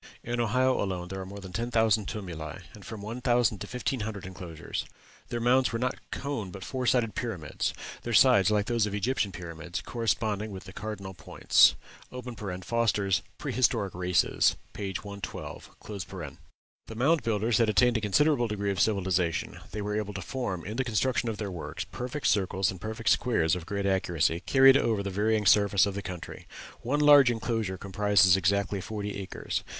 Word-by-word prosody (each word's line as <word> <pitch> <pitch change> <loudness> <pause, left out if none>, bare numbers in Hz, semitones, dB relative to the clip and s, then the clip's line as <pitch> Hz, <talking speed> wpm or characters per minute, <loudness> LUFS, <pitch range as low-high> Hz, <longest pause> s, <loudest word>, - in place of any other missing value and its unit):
In 120 0 -3
Ohio 125 +3 +2
alone 90 -3 -3
there 95 0 -5
are 95 - -7
more 100 +1 -9
than 95 -1 -10
ten 115 +5 -2
thousand 110 -3 +2
tumuli, 85 -8 -6
and - - -13
from 105 -2 -8
one 115 +4 -6
thousand 120 -4 +2
to - - -6
fifteen 125 +1 -2
hundred 105 -3 -5
enclosures. 90 -4 -6 0.5
Their 120 - -2
mounds 125 +2 +3
were 115 - -1
not 125 +2 -2
cones 130 -9 -4
but 95 -1 -8
four 130 -2 -3
sided 115 -5 +2
pyramids 95 -12 -3 0.3
their 120 - -5
sides, 110 -4 +6
like 105 -1 +2
those 115 -2 +1
of 100 - -5
the - - -1
Egyptian 105 -1 0
pyramids, 85 -1 -6
corresponding 110 -1 -1
with 95 -2 -8
the - - -11
cardinal 100 -3 -6
points. 75 -6 +4 0.9
(Foster's 105 -4 +1 0.2
"Prehistoric 100 -6 0
Races," 90 0 +2 0.2
p. 100 -2 -4
112.) 100 +1 -7 1.2
The 110 - -8
Mound 150 +8 +3
Builders 110 +1 +1
had 115 -2 +3
attained 120 +4 +4
a 115 - 0
considerable 120 +4 +3
degree 100 -2 -2
of 95 - -3
civilization; 95 -5 0
they 105 +1 -5
were 105 0 -2
able 105 -2 -3
to 95 - -4
form, 100 -10 -4
in 105 +5 -5
the 130 - +1
construction 120 +1 0
of 110 - -4
their 105 -2 -4
works, 85 -3 -5
perfect 125 +4 -6
circles 95 -1 +2
and 95 -2 -10
perfect 110 +1 -2
squares 80 -11 +2
of 90 -1 -7
great 100 -1 -2
accuracy, 85 -4 +1
carried 135 0 +7
over 110 -7 0
the 100 - -3
varying 105 +2 +1
surface 100 -1 +5
of 100 - -3
the 100 - -4
country. 90 -3 -8 0.3
One 145 +5 0
large 145 -3 +8
enclosure 115 -4 -2
comprises 100 -1 +4
exactly 100 +1 +1
forty 105 +1 -5
acres. 95 -2 -4
105 Hz, 180 wpm, -28 LUFS, 95-120 Hz, 1.2 s, large